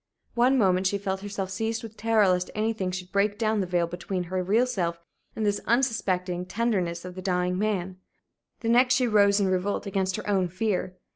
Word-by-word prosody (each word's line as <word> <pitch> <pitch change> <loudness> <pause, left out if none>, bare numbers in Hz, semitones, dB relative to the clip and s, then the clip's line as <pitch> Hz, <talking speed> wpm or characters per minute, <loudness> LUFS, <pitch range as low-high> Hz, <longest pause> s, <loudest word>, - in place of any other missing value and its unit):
One 250 +3 +3
moment 190 -4 +3
she 200 - 0
felt 195 -1 -3
herself 195 -2 -4
seized 225 +4 -2
with 220 -1 -9
terror 225 -2 +3
lest 180 -1 +1
anything 215 -3 -1
should 180 0 -6
break 205 +1 +1
down 220 -1 +1
the 190 - -1
veil 175 -1 +1
between 175 +2 -4
her 185 +1 -2
real 210 +7 +2
self 175 -9 -2 0.4
and 220 - -1
this 205 0 0
unsuspecting 185 -8 0
tenderness 185 -7 -1
of 180 - -7
the 185 - -7
dying 180 0 0
man; 190 -3 -2 0.6
the 230 - -1
next 250 +2 +5
she 250 -1 +2
rose 200 -2 +4
in 200 - +2
revolt 185 +3 -1
against 190 -1 -1
her 215 - -6
own 195 -3 +2
fear. 185 0 -2
195 Hz, 200 wpm, -26 LUFS, 180-220 Hz, 0.6 s, next